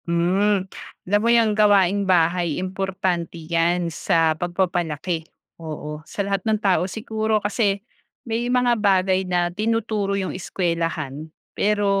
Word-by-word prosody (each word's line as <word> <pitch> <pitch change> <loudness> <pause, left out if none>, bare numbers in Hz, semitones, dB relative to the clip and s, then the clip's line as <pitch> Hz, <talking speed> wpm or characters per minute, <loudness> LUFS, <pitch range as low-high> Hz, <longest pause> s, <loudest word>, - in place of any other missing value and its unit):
Hmm, 185 +4 +1 0.4
alam 205 +3 +2
mo 230 - +1
yang 230 -2 +4
gawaing-bahay, 185 -5 +3
importante 185 -2 -2
yan 170 +1 0
sa 165 -2 +2
pagpapalaki, 175 -1 -2 0.3
oo, 150 -1 -6
sa 200 - -3
lahat 200 -1 -1
ng 220 +2 +1
tao 190 -2 +1
siguro. 220 +1 -1
Kasi 205 -1 0 0.5
may 235 +1 -2
mga 245 -2 +2
bagay 190 -2 +2
na 175 -1 0
tinuturo 215 -1 -1
yung 190 -2 -2
eskwelahan, 165 -5 -3 0.2
pero 205 0 +1
190 Hz, 120 wpm, -22 LUFS, 170-205 Hz, 0.5 s, yang